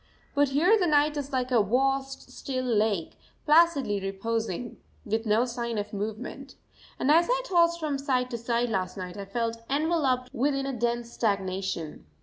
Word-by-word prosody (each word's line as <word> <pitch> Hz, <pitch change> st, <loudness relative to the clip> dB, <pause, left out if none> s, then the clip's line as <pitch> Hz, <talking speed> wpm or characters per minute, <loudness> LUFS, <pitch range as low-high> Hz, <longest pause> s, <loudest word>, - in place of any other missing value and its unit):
But 285 Hz, -1 st, +3 dB
here 350 Hz, +11 st, +4 dB
the 360 Hz, -, +2 dB
night 300 Hz, 0 st, +3 dB
is 285 Hz, -1 st, -4 dB
like 255 Hz, -1 st, -1 dB
a 235 Hz, -3 st, +5 dB
vast, 270 Hz, +5 st, 0 dB
still 255 Hz, -2 st, -4 dB
lake, 215 Hz, -7 st, 0 dB, 0.3 s
placidly 300 Hz, -9 st, +4 dB
reposing, 220 Hz, +3 st, -3 dB, 0.3 s
with 220 Hz, +2 st, -1 dB
no 215 Hz, +3 st, +3 dB
sign 235 Hz, -2 st, -3 dB
of 210 Hz, +1 st, -4 dB
movement. 220 Hz, +7 st, -5 dB, 0.4 s
And 280 Hz, -, +2 dB
as 335 Hz, +2 st, +5 dB
I -, -, +2 dB
tossed 340 Hz, -5 st, +3 dB
from 295 Hz, -4 st, -2 dB
side 255 Hz, -2 st, 0 dB
to 235 Hz, -, -2 dB
side 235 Hz, +1 st, 0 dB
last 185 Hz, -3 st, -2 dB
night 180 Hz, -1 st, -6 dB
I 200 Hz, -1 st, -6 dB
felt 230 Hz, +3 st, -2 dB
enveloped 280 Hz, -4 st, +1 dB
within 275 Hz, +2 st, 0 dB
a 275 Hz, -, -2 dB
dense 235 Hz, 0 st, -1 dB
stagnation. 190 Hz, -, -2 dB
245 Hz, 165 wpm, -27 LUFS, 215-280 Hz, 0.4 s, a